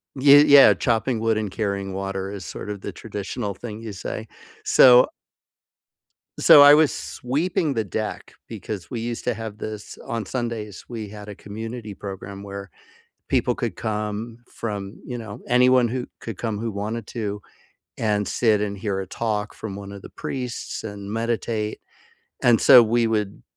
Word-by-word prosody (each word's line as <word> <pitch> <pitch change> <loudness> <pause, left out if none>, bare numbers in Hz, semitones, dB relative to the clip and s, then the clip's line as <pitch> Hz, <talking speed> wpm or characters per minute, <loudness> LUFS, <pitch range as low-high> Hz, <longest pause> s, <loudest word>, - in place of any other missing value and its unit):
ye 140 +2 +7
yeah, 140 -2 +8
chopping 120 -1 0
wood 110 -1 +1
and 105 -3 -2
carrying 100 -2 -2
water 95 0 -4
is 100 -3 -7
sort - - -7
of 100 -2 -7
the - - -6
traditional 105 0 -5
thing 110 -1 -8
you 110 - -6
say. 110 +3 -6 0.4
So 125 -1 +7 1.3
So 145 - +9
I 145 0 +10
was 155 -1 +5
sweeping 150 +3 -1
the 110 -2 0
deck 105 +3 -5
because 100 -5 -7
we 115 - -4
used 120 0 -4
to 125 - +1
have 110 -1 -7
this 110 -1 -7
on 115 -2 -3
Sundays, 115 -4 -4
we 110 -4 -6
had 105 0 -10
a 105 - -8
community 110 +2 -7
program 100 0 -8
where 100 -1 -8 0.6
people - - +2
could - - -3
come 105 +1 -4
from, 100 -3 -6
you 125 -1 -5
know, 105 -3 -8
anyone 125 0 +4
who 125 +1 -3
could 115 -5 -7
come 110 -3 -2
who 115 0 -3
wanted 105 +2 -4
to 105 -3 -4 0.6
and 105 -2 0
sit 110 -4 +2
and 100 -1 -3
hear 100 -2 -2
a 95 - -5
talk 105 0 -3
from 105 -3 -6
one 100 0 -8
of 100 -1 -9
the - - -11
priests 125 -3 -5
and 100 -1 -7
meditate. 115 -1 -2 0.6
And 120 -2 +5
so 125 - +9
we 115 +1 +2
would 105 - -2
110 Hz, 170 wpm, -23 LUFS, 100-120 Hz, 1.3 s, I